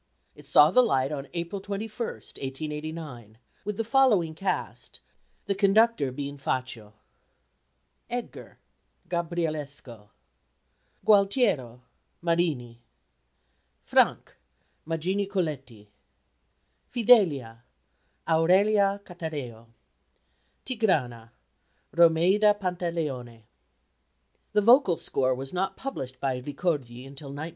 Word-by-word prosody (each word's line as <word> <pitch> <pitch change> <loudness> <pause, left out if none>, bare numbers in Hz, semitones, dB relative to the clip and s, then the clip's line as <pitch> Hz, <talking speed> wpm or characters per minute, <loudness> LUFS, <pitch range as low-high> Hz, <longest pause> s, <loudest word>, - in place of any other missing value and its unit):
It 145 -1 -17
saw 150 +2 +6
the 255 - +6
light 135 - +1
on 140 -2 -5
April 170 +3 -4
21, 205 +2 -5
1889, 150 -4 -7 0.3
with 205 0 -4
the 225 - 0
following 225 - +3
cast, 185 +4 -4 0.5
the 200 - 0
conductor 200 - +3
being 140 +2 -6
Faccio: 120 -6 -4 1.2
Edgar 245 0 -6 0.5
GABRIELESCO. 155 -10 -4 1.0
Gualtiero 200 - +2 0.4
MARINI. 155 -9 -1 1.0
Frank - - +1 0.5
MAGINI 185 +5 -1
COLETTI. 140 - -4 1.0
Fidelia 165 - +3 0.6
AURELIA 195 +5 +3
CATAREO. 145 -10 -7 1.0
Tigrana 145 - -1 0.7
ROMEIDA 175 +5 +5
PANTALEONE. 165 - -3 1.1
The 210 - +4
vocal 230 - +5
score 130 -1 0
was 135 +4 -7
not 190 +1 -2
published 130 - -6
by 130 -2 -2
Ricordi 135 -4 -3
until 140 +1 -11
1905. 140 +2 -7
160 Hz, 85 wpm, -27 LUFS, 135-195 Hz, 1.2 s, saw